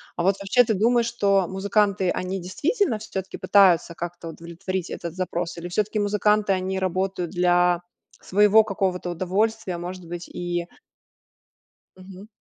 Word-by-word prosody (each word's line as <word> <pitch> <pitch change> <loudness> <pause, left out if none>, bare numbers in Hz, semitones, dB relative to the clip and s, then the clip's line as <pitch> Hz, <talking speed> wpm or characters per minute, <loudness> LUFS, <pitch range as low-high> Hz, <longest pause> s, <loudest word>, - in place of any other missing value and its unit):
А 170 - -2
вот 195 +1 +3
вообще 200 +6 +4
ты 220 - 0
думаешь, 235 +4 +2
что 200 -5 +1
музыканты, 195 0 +1
они 185 +1 -2
действительно 280 - 0
всё-таки 195 -3 -6
пытаются 180 -4 +4
как-то 175 0 -6
удовлетворить 170 +2 -5
этот 170 -2 -6
запрос 175 -2 -3
или 175 - -6
всё-таки 210 +4 -1
музыканты, 210 0 +2
они 190 +1 -2
работают 185 -1 -1
для 175 -1 +2 0.4
своего 210 +2 +5
какого-то 185 -3 -2
удовольствия, 190 +2 -1
может 175 0 -7
быть, 175 0 -7
и 175 -1 -3 1.3
Мгм. 190 +2 -12
190 Hz, 135 wpm, -24 LUFS, 175-205 Hz, 1.3 s, своего